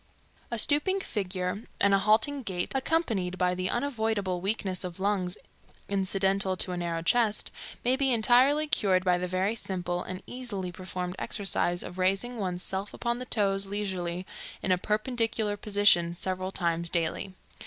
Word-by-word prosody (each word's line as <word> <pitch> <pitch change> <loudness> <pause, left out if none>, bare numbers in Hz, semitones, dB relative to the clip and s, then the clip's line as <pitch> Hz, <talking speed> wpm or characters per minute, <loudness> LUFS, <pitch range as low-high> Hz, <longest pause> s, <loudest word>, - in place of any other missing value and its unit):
A 235 - -2
stooping 305 - +2
figure 190 - -3 0.2
and 200 0 +4
a 195 - +5
halting 220 +8 +3
gait, 180 -6 -3
accompanied 235 - 0
by 180 0 +2
the 185 0 -1
unavoidable 220 -8 -1
weakness 195 -2 -1
of 180 0 -6
lungs 190 -2 0 0.5
incidental 195 -1 +1
to 185 - +2
a 180 - -3
narrow 170 -1 -2
chest, 215 +2 +2 0.3
may 250 +1 +4
be 270 -1 +2
entirely 255 +6 +4
cured 190 -10 +2
by 180 -1 +3
the 180 - -2
very 185 +4 0
simple 180 -5 -2
and 185 +1 -6
easily 210 -8 -4
performed 180 0 -5
exercise 175 -3 +1
of 180 +1 -8
raising 195 +6 +1
one's 180 -2 -2
self 195 +2 -3
upon 235 0 -1
the 255 - -5
toes 195 -4 +1
leisurely 185 -3 -3 0.4
in 190 - +1
a 180 - +5
perpendicular 220 0 0
position 200 -5 +3
several 185 +1 -2
times 170 -2 -1
daily. 175 +3 -1
195 Hz, 155 wpm, -28 LUFS, 180-220 Hz, 0.5 s, a